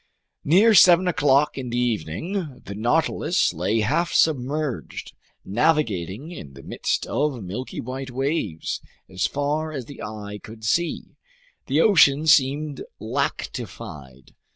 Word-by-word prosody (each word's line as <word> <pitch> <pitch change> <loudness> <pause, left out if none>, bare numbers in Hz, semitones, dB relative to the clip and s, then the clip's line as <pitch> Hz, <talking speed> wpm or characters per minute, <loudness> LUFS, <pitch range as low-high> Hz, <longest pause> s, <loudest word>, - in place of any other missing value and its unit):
Near 200 +9 +5
seven 180 -1 +7
o'clock 145 -3 +2
in 125 -2 -5
the 120 - -2
evening, 125 - -3
the 100 - -6
Nautilus 150 - +1
lay 95 +7 0
half 155 +11 0
submerged, 145 -2 -1 0.3
navigating 115 - 0
in 70 - -9
the 70 - -12
midst - - -2
of 140 -6 -1
milky 105 +8 -6
white 130 +2 -5
waves. 130 - -2 0.3
As 95 0 -1
far 150 +2 -2
as 135 -5 -5
the 140 - -11
eye 105 -1 -7
could 110 0 -12
see, 170 +9 -1 0.5
the 145 +4 +2
ocean 155 -7 +5
seemed 145 0 +3 0.2
lactified. 90 - -5
135 Hz, 125 wpm, -23 LUFS, 110-155 Hz, 0.5 s, seven